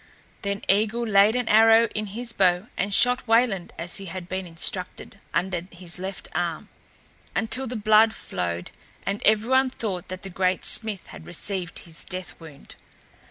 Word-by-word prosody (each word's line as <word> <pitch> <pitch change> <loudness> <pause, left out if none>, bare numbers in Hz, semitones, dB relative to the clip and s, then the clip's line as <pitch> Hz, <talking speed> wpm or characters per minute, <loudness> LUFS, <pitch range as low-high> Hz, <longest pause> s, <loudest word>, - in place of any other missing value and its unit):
Then 200 -1 -3
Eigil 220 +4 +2
laid 205 +2 +5
an 250 -2 0
arrow 225 +1 +6
in 215 0 -3
his 230 +4 -5
bow 185 +1 +2
and 200 +2 -2
shot 250 +4 +4
Wayland 225 -5 +2
as 170 +1 -2
he 195 - -6
had 185 -1 -7
been 185 0 -4
instructed, 180 +4 -3
under 180 -2 -1
his 175 -1 -3
left 190 +1 -6
arm, 170 -1 -3 0.7
until 250 +4 +2
the 245 - -5
blood 215 +1 +5
flowed 85 -1 -4 0.3
and 200 +1 -2
everyone 250 +5 +3
thought 200 -8 -5
that 185 0 -7
the 195 - -7
great 185 0 0
smith 215 -4 +2
had - - -11
received 180 +1 -3
his 165 -1 -5
death 185 0 -6
wound. 155 -4 -13
195 Hz, 160 wpm, -24 LUFS, 180-225 Hz, 0.7 s, arrow